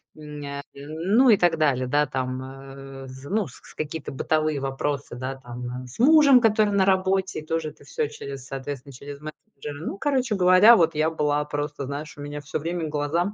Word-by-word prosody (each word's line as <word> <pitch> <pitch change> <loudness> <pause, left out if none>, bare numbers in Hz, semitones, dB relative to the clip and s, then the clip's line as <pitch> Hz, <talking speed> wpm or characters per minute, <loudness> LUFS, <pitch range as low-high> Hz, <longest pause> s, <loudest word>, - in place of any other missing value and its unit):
м, 150 -1 -9
ня 140 0 -5
м, 155 +8 -2
ну 260 0 +6
и 215 - +7
так 175 -2 +2
далее. 135 -5 +1
Да, 145 +3 +2
там, 130 -1 -3
э, 135 0 -10
зн 130 +7 -9
ну, 215 -5 +1
с 125 - -15
какие-то 155 0 -5
бытовые 155 +1 0
вопросы, 135 -1 -3
да, 130 +2 -4
там, 125 0 -7
э, - - -11
с 125 - -13
мужем, 280 -1 +7
который 215 -2 +3
на 195 -1 +3
работе, 190 -1 +1
и 155 - -11
тоже 160 0 -2
это 145 - -17
всё 145 - -2
через, 140 -2 -8
соответственно, 135 0 -6
через 140 +3 -9
мессенджеры. 150 -1 -9
Ну, - - -4
короче 260 -4 0
говоря, 185 +5 +7
вот 165 -5 +3
я 155 +1 +2
была 150 -2 0
просто, 145 -1 -4
знаешь, 145 +3 -6
у 145 - -9
меня 145 0 -5
всё 145 +1 -4
время 165 +1 -3
глаза 160 +7 -1
150 Hz, 205 wpm, -25 LUFS, 135-180 Hz, -, и